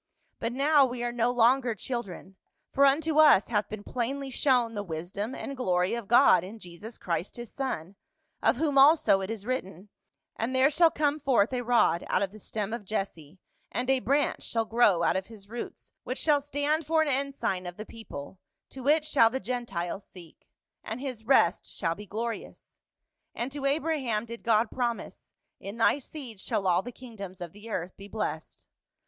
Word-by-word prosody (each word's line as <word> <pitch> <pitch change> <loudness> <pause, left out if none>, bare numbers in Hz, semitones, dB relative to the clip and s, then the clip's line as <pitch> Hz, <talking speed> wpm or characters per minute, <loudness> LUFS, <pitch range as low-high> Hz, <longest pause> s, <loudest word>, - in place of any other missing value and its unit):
But 230 - -2
now 285 +3 +4
we 245 -2 -1
are 240 - -1
no 240 0 +1
longer 245 0 +3
children, 200 -5 -6 0.4
for 280 0 +5
unto 310 +2 +2
us 295 -10 +6
hath 210 -3 0
been 215 -1 -7
plainly 265 +4 -3
shown 250 -4 +2
the 205 - -3
wisdom 190 +6 -5
and 275 - -6
glory 180 -7 +1
of 235 -3 -4
God 235 -7 +6
in 200 +5 -8
Jesus 205 +4 -10
Christ 175 +1 -3
his 240 -2 -8
son, 200 - -4 0.5
of - - +3
whom 285 0 +2
also 275 -9 +6
it 190 - -4
is 220 -3 -5
written, 205 -6 -4 0.2
' - - -53
And 240 +4 -1
there 265 +3 +5
shall 335 +2 +5
come 300 -1 0
forth 260 -5 +2
a 250 - 0
rod 235 -8 +3
out - - +1
of 195 - -3
the 215 - -12
stem 215 +1 -4
of 235 - -4
Jesse, 190 -6 -4 0.3
and 255 +2 0
a 265 - +3
branch 280 +3 +1
shall 225 -1 -1
grow 215 -7 +3
out - - +2
of 190 0 -2
his 210 -3 -13
roots 235 +3 -8
which 255 - -4
shall 295 -2 +3
stand 290 +2 -1
for 320 0 +3
an - - -2
126 275 -1 -1
PAUL. - - -1
ensign 185 -2 -2
of 175 - -13
the 215 - -6
people; 190 -8 -9 0.3
to 265 0 -8
it 305 +1 +4
shall 275 -7 +5
the 260 +3 -3
Gentiles 200 -6 -4
seek; 175 -4 -14 0.4
and 225 +3 -5
his 250 -5 -6
rest 265 +3 +3
shall 165 -3 -1
be 205 +4 -11
glorious.' 230 +3 -6 0.6
And 240 +3 -3
to 280 0 -5
Abraham 275 -7 0
did 235 0 -8
God 225 0 +2
promise, 240 -2 -4
' - - -55
in 200 +3 -7
thy 230 +5 +3
seed 255 -6 -9
shall 195 - -2
all 180 -1 +3
the 245 - -8
kingdoms 205 -7 -10
of 175 -2 -6
the 210 +3 -12
earth 180 -3 -4
be 200 - -10
blessed.' 160 -7 -5
235 Hz, 200 wpm, -28 LUFS, 200-270 Hz, 0.6 s, us